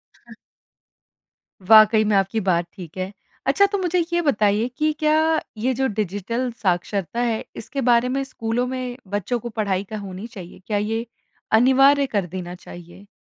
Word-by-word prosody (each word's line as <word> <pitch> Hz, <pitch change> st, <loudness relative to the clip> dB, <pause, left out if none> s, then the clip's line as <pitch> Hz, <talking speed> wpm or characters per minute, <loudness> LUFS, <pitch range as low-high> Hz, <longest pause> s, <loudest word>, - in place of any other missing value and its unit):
हाँ। -, -, -16 dB, 1.3 s
वाक़ई 215 Hz, +1 st, +7 dB
में 210 Hz, -1 st, +2 dB
आपकी 195 Hz, +3 st, +1 dB
बात 180 Hz, -4 st, +1 dB
ठीक 180 Hz, -3 st, -11 dB
है। 185 Hz, +1 st, -3 dB, 0.4 s
अच्छा 400 Hz, -, +5 dB
तो 405 Hz, -, 0 dB
मुझे 360 Hz, -2 st, 0 dB
ये 345 Hz, -, +2 dB
बताइए 215 Hz, -6 st, +2 dB
कि 310 Hz, 0 st, +2 dB
क्या 305 Hz, 0 st, +3 dB, 0.4 s
ये 255 Hz, +4 st, 0 dB
जो 265 Hz, +1 st, 0 dB
डिजिटल 215 Hz, +4 st, -2 dB
साक्षरता 190 Hz, +2 st, -1 dB
है, 230 Hz, -2 st, 0 dB
इसके 275 Hz, +5 st, -5 dB
बारे 245 Hz, 0 st, +3 dB
में 270 Hz, +1 st, -1 dB
स्कूलों 240 Hz, -1 st, -2 dB
में 255 Hz, -1 st, -4 dB
बच्चों 205 Hz, +5 st, -2 dB
को 240 Hz, +1 st, -6 dB
पढ़ाई 200 Hz, -3 st, -1 dB
क्या 215 Hz, +1 st, -7 dB
होनी 195 Hz, +2 st, -7 dB
चाहिए? 190 Hz, -8 st, -11 dB
क्या 210 Hz, -, 0 dB
ये 225 Hz, +3 st, -2 dB, 0.5 s
अनिवार्य 270 Hz, +3 st, +5 dB
कर 205 Hz, -7 st, -1 dB
देना 180 Hz, 0 st, -6 dB
चाहिए? 175 Hz, +2 st, -13 dB
220 Hz, 165 wpm, -22 LUFS, 195-255 Hz, 1.3 s, वाक़ई